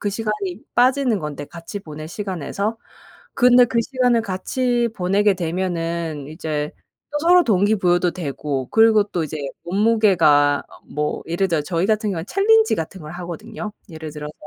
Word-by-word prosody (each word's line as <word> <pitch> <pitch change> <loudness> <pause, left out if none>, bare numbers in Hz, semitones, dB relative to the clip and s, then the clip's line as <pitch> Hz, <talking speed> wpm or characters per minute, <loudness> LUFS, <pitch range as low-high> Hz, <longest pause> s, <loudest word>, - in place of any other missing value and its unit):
그 205 - -1
시간이 210 -2 -3
빠지는 250 -3 +3
건데 145 -1 -6
같이 170 +5 -8
보낼 155 -4 -9
시간에서 200 +3 -3 0.6
근데 250 -1 +6
그 235 - 0
시간을 250 -2 +1
같이 240 +5 -1
보내게 195 +2 +2
되면은 170 -4 -3
이제 155 -2 -3 0.4
또 295 - -1
서로 350 +3 +5
동기부여도 190 - +2
되고 140 -5 -4
그리고 220 -1 +5
또 180 -5 -3
이제 155 0 -5 0.3
몸무게가 175 -8 +3
어 - - -17
뭐 150 +1 -2
예를 175 +4 0
들어서 165 -4 0
저희 170 +2 -1
같은 215 -1 +1
경우에는 165 -3 -4
챌린지 440 - +4
같은 165 +3 -5
걸 155 0 -9
하거든요. 210 +5 -7 0.2
예를 160 -1 -7
들어서 150 0 -7
185 Hz, 345 characters per minute, -21 LUFS, 160-220 Hz, 0.6 s, 근데